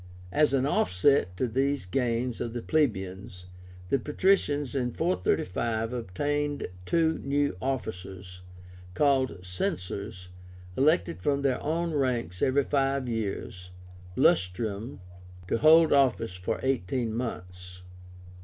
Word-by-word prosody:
As 150 +4 +3
an 135 -1 +2
offset 90 -5 +2
to 130 - 0
these 135 0 0
gains 120 +3 -1
of 115 -1 -3
the 120 - -4
plebeians, 95 - -1 0.4
the 135 - +2
patricians 150 -3 +1
in 125 -3 0
435 115 - -1
obtained 145 +7 -2 0.2
two 160 -1 +2
new 145 -3 0
officers, 95 -8 -5 0.5
called 135 -5 +2
CENSORS, 90 +1 -4 0.5
elected 90 - +2
from 140 +5 0
their 135 -2 +1
own 165 +2 -1
ranks 120 - -1
every 140 +2 +3
five 135 -1 0
years 100 -5 -4 0.5
(lustrum) 100 +5 +1 0.5
to 115 - 0
hold 160 +1 +6
office 125 -7 +2
for 90 0 -3
eighteen 125 -2 -1
months. 90 -6 -6
125 Hz, 110 wpm, -28 LUFS, 90-140 Hz, 0.5 s, hold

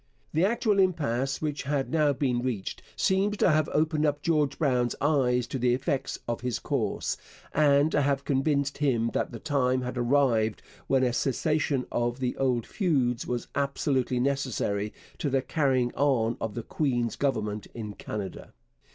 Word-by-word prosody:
The 160 - +2
actual 215 -1 +2
impasse 140 -7 +1
which 150 -2 -2
had 140 -1 -1
now 155 -2 +3
been 130 -3 0
reached 120 -7 -3
seems 200 +2 +1
to 180 - +4
have 155 0 +2
opened 155 -1 +2
George 150 -4 +1
Brown's 125 -6 +1
eyes 130 -4 +2
to 135 - -4
the 125 0 +3
effects 135 +1 -2
of 120 -1 -2
his 125 -2 -1
course, - - -2 0.4
and 145 0 +4
to - - +2
have 140 0 0
convinced 140 0 0
him 120 -6 +1
that - - -1
the - - -6
time 130 -4 0
had 125 0 -3
arrived 120 -4 +2 0.2
when 135 -1 +3
a 125 -2 +1
cessation 145 +1 0
of 120 +1 -1
the 125 -1 -1
old 125 -4 +1
feuds 135 - 0
was 120 -1 -2
absolutely 140 -2 0
necessary 125 -6 -1 0.3
to 145 - 0
the 135 -1 +1
carrying 130 -6 +1
on 120 -5 +2
of 110 -2 -3
the 115 - -4
queen's 120 -4 -1
government 105 -7 -1
in 105 -3 -5
Canada. 100 -2 -6
135 Hz, 160 wpm, -28 LUFS, 120-145 Hz, 0.4 s, to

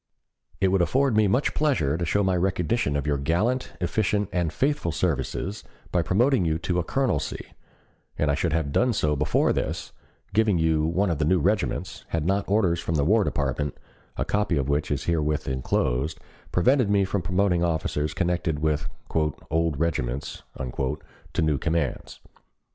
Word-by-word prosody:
"It 95 - +3
would 95 -1 +2
afford 130 +6 +2
me 110 -1 +4
much 125 +9 +1
pleasure 105 - +1
to 85 0 -2
show 100 +5 +2
my 95 -1 +2
recognition 90 -1 0
of 70 - -3
your 70 -2 0
gallant, 105 - 0
efficient, 105 +2 0
and 85 -3 0
faithful 135 - 0
services, 85 +5 -2 0.3
by 90 - +2
promoting 120 +7 +2
you 80 -2 +1
to 90 +2 -1
a - - 0
colonelcy, 125 - -2 0.6
and 75 -1 +2
I - - +1
should 80 +3 0
have 80 -3 0
done 125 - +2
so 75 -7 +1
before 75 +2 +2
this, - - -3 0.4
giving 105 -3 +3
you 80 -1 +2
one 90 +3 +1
of 80 - -2
the 75 - +2
new 90 +3 +3
regiments, 100 +5 -1
had 80 -2 -2
not 100 +2 0
orders 95 -5 +2
from 80 0 -2
the 70 -2 +2
War 105 +5 +4
Department, 70 -3 -2 0.4
a - - -1
copy 105 -5 0
of 65 -2 0
which 70 +1 0
is 70 -1 -1
herewith 75 -3 0
enclosed, 65 +3 -1 0.3
prevented 125 +5 +3
me 100 -1 +3
from 100 0 -1
promoting 90 0 +1
officers 80 -2 -1
connected 85 -3 0
with 75 -2 0 0.2
'old 80 0 0
regiments' 70 -6 -2 0.2
to 65 0 -4
new 75 -3 +1
commands. 80 -5 -2
85 Hz, 170 wpm, -25 LUFS, 75-100 Hz, 0.6 s, me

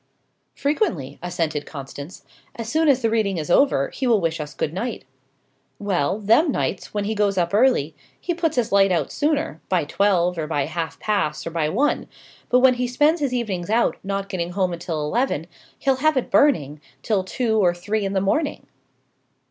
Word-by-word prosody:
"Frequently," 275 - -1
assented 165 -4 -2
Constance. 140 +3 -9 0.3
"As 230 -1 -6
soon 315 +6 +1
as 265 -3 +3
the 225 - +3
reading 210 -5 +1
is 160 +2 -3
over, 175 - +3
he 260 - -3
will 230 -3 +4
wish 165 -2 -1
us 150 -1 -6
good 150 - -2
night." 230 +5 -4 0.7
"Well, 190 -3 0
them 230 - +3
nights, 195 - -2
when 205 -1 -2
he 210 +2 -1
goes 205 -2 +1
up 175 0 0
early, 210 - +3 0.3
he 350 - -2
puts 330 -2 -1
his 245 -3 0
light 195 -1 +4
out 165 -6 0
sooner 295 - -1
by 180 -3 +2
twelve, 180 +1 +1
or 155 - -2
by 145 -3 0
half 165 +1 -4
past, 200 -8 -1
or 165 - -4
by 160 -2 0
one; 275 - 0 0.4
but 250 0 +4
when 260 0 +6
he 250 0 -1
spends 295 +7 +2
his 280 -3 0
evenings 205 -8 -2
out, 230 +2 +2
not 195 0 -3
getting 175 -2 -3
home 185 -2 0
until 170 -2 -4
eleven, 225 - 0 0.3
he'll 270 -1 +1
have 310 +1 +2
it 255 - -1
burning 150 - +3 0.2
till 200 -4 +1
two 220 +3 0
or 175 -1 +3
three 205 +4 -2
in 195 0 -2
the 190 - +1
morning." 285 +11 -1
200 Hz, 190 wpm, -22 LUFS, 170-250 Hz, 0.7 s, when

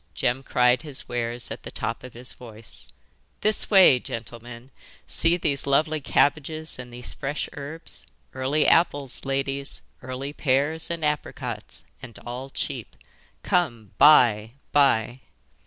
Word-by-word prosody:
Jem 125 +2 0
cried 125 -1 +3
his 150 -4 -2
wares 120 0 -3
at - - -6
the - - -8
top - - -4
of 125 - -10
his 125 +1 -5
voice: 110 - -10 0.5
'This 215 0 +1
way, 190 -11 +7
gentlemen! 120 +2 -8 0.3
See 165 +1 +3
these 140 -5 0
lovely 155 +2 +2
cabbages 155 +2 0
and 125 -1 -8
these 120 0 0
fresh 145 +1 -3
herbs! 155 +1 -8 0.3
Early 135 +4 +1
apples, 145 -7 +2
ladies; 135 0 -2 0.2
early 130 +3 -5
pears 145 +3 +1
and 170 -2 -2
apricots, 125 -6 -4 0.2
and 125 -4 -10
all 125 +3 -6
cheap. 130 -6 -5 0.5
Come, 120 - 0
buy, 115 -7 +6 0.2
buy! 130 -4 +3
135 Hz, 130 wpm, -25 LUFS, 120-150 Hz, 0.5 s, way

